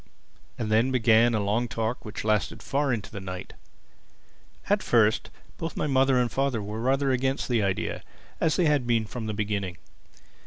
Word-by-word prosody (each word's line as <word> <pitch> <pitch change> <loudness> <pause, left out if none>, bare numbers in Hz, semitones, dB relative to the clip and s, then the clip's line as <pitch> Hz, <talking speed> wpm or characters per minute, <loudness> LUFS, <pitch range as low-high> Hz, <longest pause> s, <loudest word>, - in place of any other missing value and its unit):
And 110 -2 -3
then 115 +4 +4
began 115 -2 +4
a - - +1
long 105 +4 0
talk 115 +2 -3
which 105 -1 -6
lasted 105 -2 0
far 140 0 0
into 110 -4 -3
the 100 - -6
night. 90 -1 -7 1.1
At - - +2
first - - +2 0.3
both 165 -1 -4
my - - 0
mother 135 -2 +3
and 120 -1 +1
father 135 -3 0
were 105 +2 -5
rather 135 +2 +2
against 130 +1 0
the 120 -3 +1
idea—as 100 - -2
they 180 - +2
had 145 -5 +2
been 115 -2 +2
from 110 +1 -6
the 105 - -3
beginning. 100 -4 -2
115 Hz, 170 wpm, -26 LUFS, 105-130 Hz, 1.1 s, then